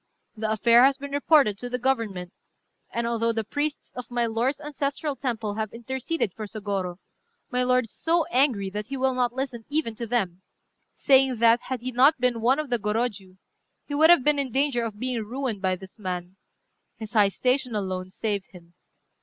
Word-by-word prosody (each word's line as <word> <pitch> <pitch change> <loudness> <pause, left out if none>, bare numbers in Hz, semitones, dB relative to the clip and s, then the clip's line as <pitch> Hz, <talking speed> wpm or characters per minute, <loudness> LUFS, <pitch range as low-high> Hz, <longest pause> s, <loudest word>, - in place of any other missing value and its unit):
The 215 0 -2
affair 235 +3 +5
has 270 0 +4
been 280 0 -8
reported 285 -7 +3
to 245 - -5
the 250 - -1
Government; 225 -9 -1 0.6
and 235 0 -2
although 230 0 +1
the 225 -1 -2
priests 290 +7 -3
of 250 -1 -7
my 240 -1 0
lord's 235 +5 0
ancestral 290 0 -3
temple 230 -6 -3
have 215 0 -3
interceded 260 - -3
for 215 -1 -6
Sôgorô, 200 -4 -3 0.6
my 250 0 +1
lord 250 -1 +3
is 225 - -15
so 330 0 +1
angry 240 -7 +2
that 210 +1 -5
he 270 +1 -4
will 260 0 +1
not 250 -1 +1
listen 260 -3 -4
even 295 -6 -1
to 230 +2 -6
them, 195 -7 -1 0.5
saying 265 -2 +4
that, 230 +1 +5
had 255 -2 -3
he 255 +1 -4
not 270 +4 +5
been 245 -2 +1
one 255 +4 +3
of 305 -4 -4
the 240 - +2
Gorôjiu, 210 -3 -2 0.5
he 290 - -7
would 315 +3 +5
have 345 -7 +7
been 295 0 +3
in 270 -3 -2
danger 270 -1 +1
of 220 -3 -5
being 250 -1 -2
ruined 240 -2 -4
by 185 -1 +1
this 190 +3 -13
man: 180 -2 -5 0.6
his 220 0 -8
high 210 -3 +5
station 250 +2 0
alone 185 -2 -3
saved 200 0 -3
him. 175 -2 -16
235 Hz, 195 wpm, -25 LUFS, 210-265 Hz, 0.6 s, have